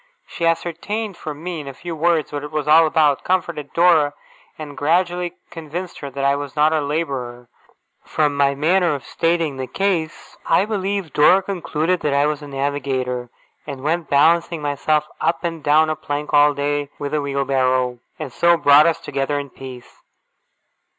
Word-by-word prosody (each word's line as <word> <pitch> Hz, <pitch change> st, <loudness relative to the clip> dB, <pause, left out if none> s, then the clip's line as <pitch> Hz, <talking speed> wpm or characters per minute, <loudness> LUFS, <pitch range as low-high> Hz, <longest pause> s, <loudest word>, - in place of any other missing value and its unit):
She 170 Hz, -, -2 dB
ascertained 180 Hz, +5 st, -2 dB
from 155 Hz, -1 st, -8 dB
me 175 Hz, -2 st, -4 dB
in 145 Hz, -, -8 dB
a 135 Hz, -, -7 dB
few 170 Hz, +2 st, -6 dB
words 165 Hz, -1 st, +1 dB
what 145 Hz, -1 st, -4 dB
it 150 Hz, -, -6 dB
was 150 Hz, -1 st, -3 dB
all 160 Hz, +1 st, +6 dB
about, 150 Hz, -3 st, +2 dB
comforted 170 Hz, -5 st, -2 dB
Dora, 160 Hz, -4 st, +4 dB, 0.4 s
and 150 Hz, -2 st, -8 dB
gradually 175 Hz, +3 st, 0 dB, 0.2 s
convinced 170 Hz, +2 st, -7 dB
her 140 Hz, -, -6 dB
that 135 Hz, +1 st, -3 dB
I 140 Hz, 0 st, +3 dB
was 145 Hz, -1 st, -6 dB
not 155 Hz, +1 st, +3 dB
a 155 Hz, -, +1 dB
labourer 135 Hz, -5 st, -4 dB, 0.5 s
from 150 Hz, -2 st, 0 dB
my 140 Hz, 0 st, +2 dB
manner 170 Hz, +3 st, +2 dB
of 140 Hz, -, -8 dB
stating 165 Hz, -4 st, 0 dB
the 130 Hz, -1 st, -4 dB
case 180 Hz, -4 st, -2 dB
I 190 Hz, -, +2 dB
believe 200 Hz, -4 st, -3 dB
Dora 185 Hz, +6 st, +5 dB
concluded 180 Hz, -2 st, -1 dB
that 145 Hz, -3 st, -1 dB
I 140 Hz, +1 st, +3 dB
was 150 Hz, 0 st, -1 dB
a 145 Hz, -, -9 dB
navigator, 135 Hz, -3 st, -2 dB, 0.4 s
and 135 Hz, -3 st, -7 dB
went 165 Hz, +2 st, -1 dB
balancing 165 Hz, +3 st, +3 dB
myself 150 Hz, +1 st, 0 dB
up 170 Hz, -, 0 dB
and 165 Hz, -2 st, -3 dB
down 155 Hz, +2 st, +4 dB
a 155 Hz, -, -1 dB
plank 145 Hz, 0 st, -5 dB
all 145 Hz, 0 st, +5 dB
day 145 Hz, 0 st, -1 dB
with 145 Hz, 0 st, -5 dB
a 150 Hz, -, +1 dB
wheelbarrow 130 Hz, -3 st, 0 dB, 0.2 s
and 145 Hz, -6 st, -7 dB
so 170 Hz, +4 st, +4 dB
brought 145 Hz, 0 st, +6 dB
us 165 Hz, -, +1 dB
together 140 Hz, +1 st, -2 dB
in 140 Hz, -2 st, -5 dB
peace. 130 Hz, -2 st, -11 dB
150 Hz, 175 wpm, -20 LUFS, 140-170 Hz, 0.5 s, all